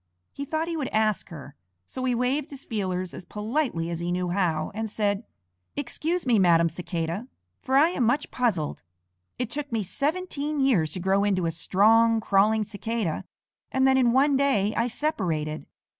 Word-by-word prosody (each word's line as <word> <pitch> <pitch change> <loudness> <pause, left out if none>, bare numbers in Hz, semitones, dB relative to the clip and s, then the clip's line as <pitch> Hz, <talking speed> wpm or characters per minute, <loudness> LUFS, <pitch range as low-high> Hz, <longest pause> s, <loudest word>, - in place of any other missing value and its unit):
He 280 - -5
thought 315 +3 -2
he 335 - -2
would 290 -5 -2
ask 215 -2 0
her, 145 -5 -10 0.3
so 255 - -6
he 250 -1 +1
waved 260 +4 0
his 280 -2 -9
feelers 185 -4 -3
as - - -8
politely 210 - -2
as 170 - -3
he 175 +1 -2
knew 180 0 -1
how, 170 -4 0
and 220 +1 -3
said, 205 0 -1 0.5
"Excuse 315 +5 -2
me, 235 -4 +4
Madam 170 -2 +5
Cicada, 170 +5 -4 0.3
for 265 0 +1
I 310 +4 +6
am 315 -8 -1
much 245 +6 +1
puzzled. 205 - -1 0.6
It 250 -2 -3
took 290 -2 -4
me 225 -2 0
seventeen 300 - -2
years 210 - +2
to - - -4
grow 190 +2 +2
into 190 -4 +1
a 165 - 0
strong, 225 +7 +4
crawling 215 +1 +3
Cicada, 210 -3 -3 0.5
and 265 0 +3
then 265 - +5
in 250 -3 +4
one 275 +3 +4
day 240 -7 +2
I 230 - +1
separated. 170 - -2
220 Hz, 175 wpm, -26 LUFS, 180-265 Hz, 0.6 s, I